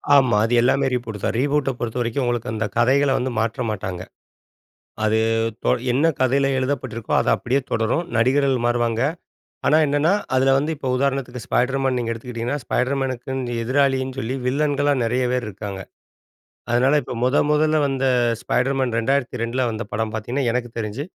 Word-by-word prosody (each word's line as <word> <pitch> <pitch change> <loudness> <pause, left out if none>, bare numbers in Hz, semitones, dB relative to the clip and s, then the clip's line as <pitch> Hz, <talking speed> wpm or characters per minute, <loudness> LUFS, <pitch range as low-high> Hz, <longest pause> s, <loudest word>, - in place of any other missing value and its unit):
ஆமா. 130 -6 +4
அது 115 - -1
எல்லாமே 135 +3 +2
ரீபூட்டு 115 -4 -3
தான். - - 0
ரீபூட்ட 145 0 +1
பொறுத்தவரைக்கும் 120 +2 -2
உங்களுக்கு 120 -2 -2
அந்த 110 0 -1
கதைகள 135 +4 +3
வந்து 130 +1 -2
மாற்ற 115 +3 -1
மாட்டாங்க. 95 -4 -4 1.0
அது 110 +1 +2 0.5
தொ - - +3 0.2
என்ன 140 +6 +3
கதைல 135 +2 +2
எழுதப்பட்டிருக்கோ, 130 -4 -3
அது - - -1
அப்டியே 130 +3 0
தொடரும். 115 +9 0
நடிகர்கள் 130 +1 +2
மாறுவாங்க. 120 -1 0 0.7
ஆனா 150 - +5
என்னனென்ன, 145 +2 +1 0.3
அதுல 135 +1 +4
வந்து 150 +4 -1
இப்ப 135 - -6
உதாரணத்துக்கு 130 -2 -1
'ஸ்பைடர் 130 +6 +1
மேன்' 130 -1 +1
நீங்க 115 -1 -2
எடுத்துக்கிட்டீங்கன்னா, 120 +3 -4
ஸ்பைடர்மேனுக்குன்னு 130 -1 -2
எதிராளின்னு 130 +1 +1
சொல்லி, 130 +1 -3
வில்லன்களா 145 +2 +1
நெறைய 125 +2 0
பேர் 125 -1 -1
இருக்காங்க. 100 -1 -6 0.9
அதனால 130 +5 +3
இப்போ, - - -6
மொத 130 +3 +2 0.2
மொதல்ல 155 +1 +2
வந்த 135 -1 -1 0.4
'ஸ்பைடர்மேன்'. 130 -1 0
2002ல 125 -1 -1
வந்த 110 +1 -4
படம் 110 +1 -2
பார்த்தீங்கன்னா, 120 +5 -2
எனக்கு 120 0 -2
தெரிஞ்சு, 110 +5 -3
125 Hz, 145 wpm, -22 LUFS, 115-135 Hz, 1.0 s, ஆனா